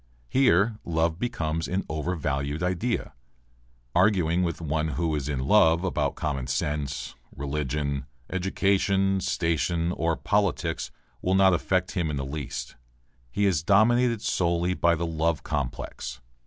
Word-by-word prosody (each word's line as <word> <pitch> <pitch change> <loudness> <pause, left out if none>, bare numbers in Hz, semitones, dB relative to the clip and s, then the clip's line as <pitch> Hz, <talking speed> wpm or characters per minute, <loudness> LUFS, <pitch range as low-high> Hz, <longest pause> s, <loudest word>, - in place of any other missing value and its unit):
Here 115 -4 +3
love 80 0 0
becomes 80 -10 -2
an 95 +2 -1
overvalued 75 -2 -2
idea. 90 - -1 0.8
Arguing 90 -5 +3
with 85 -2 -1
one 80 -1 -1
who 80 +2 -1
is 75 -1 -2
in 70 -3 -1
love 85 -2 +5
about 75 -7 0
common 70 -4 -2
sense, 70 +1 -2 0.2
religion, 70 -1 -2 0.2
education, 95 +1 +1
station, 85 -1 0
or 85 -1 0
politics 95 -5 0 0.3
will 95 +1 +1
not 95 -1 +5
affect 90 +1 0
him 85 -4 -1
in 75 - -2
the 70 -1 -3
least. 70 0 -5 0.5
He 100 +11 0
is 90 -7 +2
dominated 115 +5 +3
solely 85 0 +1
by 85 -2 +3
the 85 +1 -2
love 80 -2 0
complex. 70 -3 -4
85 Hz, 130 wpm, -26 LUFS, 75-95 Hz, 0.8 s, love